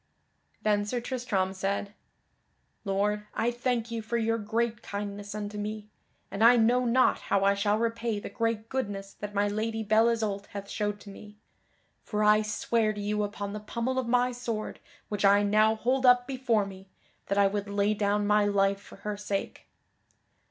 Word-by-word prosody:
Then 210 -1 +2
Sir 240 +4 -2
Tristram 235 -7 -1
said: 200 +1 -2 0.9
"Lord, 210 +2 0
I 235 +2 +1
thank 240 -1 -1
you 230 -1 -3
for 230 +2 -2
your 230 0 0
great 225 +1 -1
kindness 205 0 -5
unto 210 0 -5
me, 210 0 -5 0.4
and 200 - -1
I 235 +2 +8
know 245 +2 +3
not 250 +2 +3
how 195 -1 +3
I 200 0 +5
shall 205 +1 +1
repay 230 -1 -1
the - - -7
great 230 -1 -2
goodness 205 -6 -4
that 205 0 -7
my 205 +1 +2
Lady 220 +2 -2
Belle 220 +2 +4
Isoult 215 -4 -2
hath 200 -1 -8
showed 205 -1 -2
to 200 - -10
me. 210 +1 -13 0.6
For 210 0 -2
I 210 0 +5
swear 215 +1 0
to 210 - -7
you 210 +1 -1
upon 205 -1 -4
the 210 - -4
pommel 235 +4 -2
of 255 - -3
my 250 +1 +2
sword 235 -3 -4 0.3
which 205 -1 -3
I 200 +1 +6
now 215 +2 +4
hold 255 +4 0
up 250 0 +6
before 250 -5 0
me 190 0 -11 0.4
that 200 - -1
I 200 - +5
would 200 +1 -1
lay 200 +1 +1
down 205 0 +1
my 210 0 +4
life 200 -1 +2
for - - -14
her 210 0 -2
sake. 200 -1 -4
210 Hz, 180 wpm, -28 LUFS, 205-230 Hz, 0.9 s, I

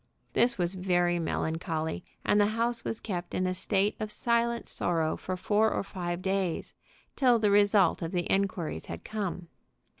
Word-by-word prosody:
This 240 0 +3
was 175 0 0
very 175 -2 +1
melancholy, 160 0 -2 0.2
and 205 - +4
the 205 - +4
house 235 0 0
was 225 - -3
kept 175 -4 -4
in 185 - +1
a 185 - 0
state 195 +2 +1
of 215 -1 -3
silent 235 +1 +1
sorrow 165 -2 0
for 185 0 -4
four 210 +4 +2
or - - -1
five 175 -2 -4
days, 190 -3 -1 0.4
till 250 -3 +4
the 210 -2 +2
result 205 -4 +4
of 165 -1 -3
the 175 -2 -1
inquiries 185 - -1
had 85 0 -7
come. 195 -5 -4
190 Hz, 170 wpm, -29 LUFS, 175-210 Hz, 0.4 s, and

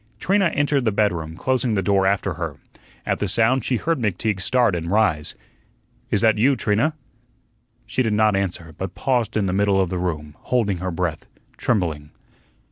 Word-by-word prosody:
Trina 195 +1 +2
entered 145 -3 +1
the 110 - +2
bedroom, 85 -6 -1
closing 125 -2 0
the 95 - 0
door 95 0 +2
after 100 -1 0
her. 80 -3 -5 0.5
At - - -1
the 105 - -1
sound, 115 +5 +2
she 125 - 0
heard 165 +5 -1
McTeague 105 -2 -1
start 120 -1 +2
and 85 0 -3
rise. 90 -7 +1 0.7
"Is 105 - +1
that 110 -2 +3
you, 135 +5 +4
Trina?" 120 +8 +1 0.9
She - - -1
did 110 -4 +1
not 105 -1 +3
answer; 90 -4 -3
but 95 -1 -5
paused 120 -5 0
in 105 - +1
the 90 - -1
middle 100 0 +2
of 95 -2 0
the 90 - -2
room, 75 -4 -3
holding 110 -7 0
her 95 +1 -3
breath, 90 -3 -3 0.3
trembling. 80 -10 -1
100 Hz, 180 wpm, -22 LUFS, 90-115 Hz, 0.9 s, you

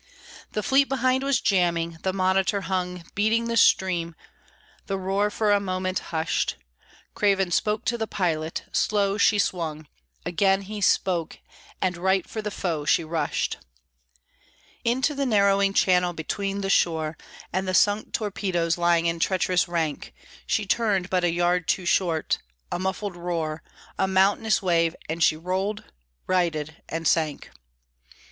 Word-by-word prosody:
The 210 - -2
fleet 270 +6 +4
behind 260 0 +1
was 275 -2 +2
jamming: 170 -5 +1
the 190 - 0
monitor 190 +1 +1
hung 180 -2 -3
Beating 220 +3 +1
the 230 0 -2
stream; 175 -6 +3 0.7
the 195 - -1
roar 195 +2 0
for 210 0 0
a 205 - +4
moment 185 -1 -2
hushed; 160 - -1 0.6
Craven 195 -3 +1
spoke 215 +4 0
to 235 0 0
the 220 - -1
pilot; 165 -5 -2
slow 205 -1 +1
she 210 - +4
swung; 160 -6 -2 0.4
Again 195 +3 +2
he 210 +1 -6
spoke, 180 -3 +1 0.5
and 180 -2 0
right 190 +1 +1
for 220 - -5
the 210 - -3
foe 170 -6 -3
she 155 +3 +2
rushed 160 -2 -2 1.3
Into 255 +5 +1
the 280 -1 -1
narrowing 200 -3 +3
channel, 180 -2 +3
between 195 +5 -3
the 195 - -2
shore 160 -3 +1 0.4
And 190 +1 -1
the 185 - 0
sunk 205 +2 +2
torpedoes 185 -5 -1
lying 170 -1 +3
in 165 0 0
treacherous 185 0 +1
rank; 165 -4 -3 0.3
She 215 - 0
turned 195 -3 0
but 180 -1 +1
a 175 - +2
yard 175 0 +1
too 185 - 0
short; 170 -3 +1 0.3
a - - -2
muffled 190 +1 -3
roar, 165 -3 -3 0.4
A 190 - +2
mountainous 195 +3 +2
wave, 165 -2 +2
and 165 +1 -1
she 155 - +4
rolled, 190 +5 -2 0.4
righted, 160 -4 -1
and 165 0 -2
sank. 155 -2 0
185 Hz, 145 wpm, -25 LUFS, 170-200 Hz, 1.3 s, fleet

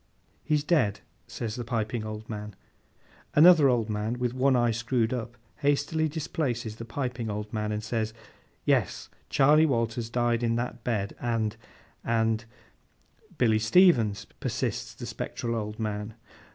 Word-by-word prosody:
'He's 150 -1 +1
dead,' 140 - +2 0.3
says 110 -3 -4
the 120 - -4
piping 115 0 -2
old 110 0 -6
man. 105 -2 -6 0.8
Another 155 -2 +8
old 120 -3 +1
man, 110 +2 -2
with 125 -1 -1
one 130 +1 +3
eye 120 -1 +3
screwed 120 +1 0
up, 120 -1 -5 0.2
hastily 145 +2 +1
displaces 140 -8 -3
the 115 - -7
piping 125 -1 -3
old 105 +1 -5
man, 105 -1 -1
and 105 0 -3
says. 110 -1 -1 0.5
'Yes! - - +1 0.2
Charley 150 +3 +5
Walters 115 -3 -1
died 120 -1 +1
in 115 -1 +1
that 120 -1 -3
bed, 105 -5 -1
and—and—' 115 0 -2 0.9
'Billy 110 -3 +3
Stevens,' 115 - +4
persists - - -3
the - - -7
spectral 115 -1 -4
old 105 -1 -3
man. 105 0 -3
115 Hz, 140 wpm, -28 LUFS, 110-125 Hz, 0.9 s, Another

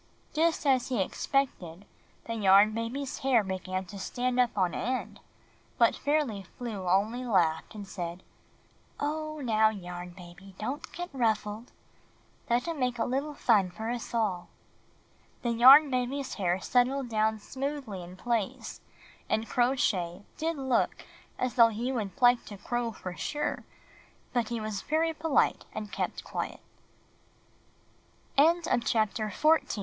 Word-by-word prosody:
Just 320 0 +1
as 260 -3 +3
he 250 -4 -1
expected, 190 -4 -1 0.4
the 230 - -3
Yarn 205 -1 +6
Baby's 240 +5 -4
hair 255 -5 +3
began 185 0 -3
to 200 +2 -9
stand 250 +5 -1
up 245 -3 +2
on 180 -3 +2
end; 255 +3 -3 0.6
but - - +4
Fairly 285 -9 0
Flew 195 -1 -6
only 215 +7 +1
laughed 180 -7 +1
and 205 -2 -7
said, 175 -2 -6 0.8
"Oh, 310 +1 -3
now, 220 -4 +3
Yarn 180 -4 -7
Baby, 185 +2 -13
don't 260 +7 -5
get 355 -2 -6
ruffled. 220 -2 -1 0.8
Let 240 +4 +1
him 330 -3 -3
make 250 -1 0
a 225 - 0
little 280 +4 -2
fun 205 -9 +3
for 220 +5 -4
us 240 -1 -5
all." 210 -7 -1 1.0
The 240 - +1
Yarn 270 +5 +8
Baby's 255 +2 -1
hair 180 -2 0
settled 255 +5 +1
down 220 0 +1
smoothly 260 -3 -5
in 175 +1 -10
place, 230 -1 -2 0.5
and 220 +1 0
Crow 245 +2 +2
Shay 180 -7 -1
did 325 0 -2
look 265 -3 0 0.3
as 255 -2 -1
though 230 -1 +7
he 235 +4 -2
would 220 -1 -4
like 245 -1 +5
to 205 - -9
crow 240 +3 -2
for 185 -3 -7
sure, 295 +10 -3 0.7
but 240 -3 0
he 235 -1 -2
was 215 -2 -4
very 320 +2 0
poli 315 -2 +2
230 Hz, 130 wpm, -29 LUFS, 195-265 Hz, 1.0 s, Yarn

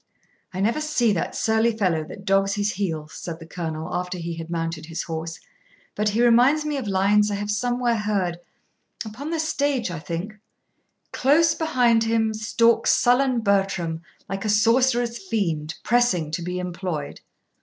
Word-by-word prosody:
'I 185 - -4
never 230 +9 +1
see 260 -8 +2
that 170 - -2
surly 220 0 +1
fellow 175 -7 +1
that 195 +5 -11
dogs 195 0 +2
his 205 0 0
heels,' 160 -7 -4
said 170 -2 -6
the 165 - -11
Colonel, 160 -1 -5
after 180 +1 -3
he 170 0 -4
had 165 0 -7
mounted 165 -1 -3
his 165 0 -4
horse, 165 0 -5 0.5
'but 210 0 0
he 230 +4 +2
reminds 255 +6 +4
me 300 -1 -1
of 255 -6 -4
lines 200 +2 +3
I 205 - -1
have 205 +1 -3
somewhere 245 +1 0
heard 195 -5 -1 0.7
upon 245 +8 -7
the 330 -1 -2
stage, 285 - 0
I 170 - -5
think: 170 +6 -5 0.8
Close 315 +5 +3
behind 245 -7 +2
him 225 -1 +1
Stalks 230 +2 +2
sullen 250 0 +3
Bertram, 195 -5 0 0.3
like 195 +1 -4
a 215 - -1
sorcerer's 235 +2 +2
fiend, 165 -7 -1
Pressing 215 -10 +2
to 170 - -3
be 180 +1 -4
employed. 180 -4 -4
205 Hz, 165 wpm, -23 LUFS, 175-235 Hz, 0.8 s, reminds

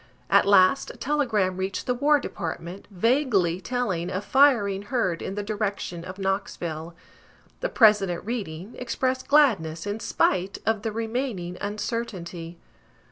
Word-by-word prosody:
At - - +5
last 200 +5 +5
a - - -10
telegram 225 -11 0
reached 190 0 -3
the 250 - +1
War 290 +4 +3
Department, 170 - -6
vaguely 200 - +1
telling 195 -7 -2
of 190 +2 -3
"Firing 235 -9 +4
heard 205 -6 -1
in 195 - -4
the 205 - -3
direction 205 -5 -3
of 185 +1 -8
Knoxville." 175 -4 -3 0.6
The - - -2
President 200 -6 +4
reading, 200 -4 -5
expressed 255 +1 -2
gladness, 205 - +3
in 205 +2 -3
spite 185 -2 0
of 220 -1 +1
the 225 0 -2
remaining 225 -5 -3
uncertainty. 195 -6 -4
200 Hz, 135 wpm, -25 LUFS, 180-240 Hz, 0.6 s, At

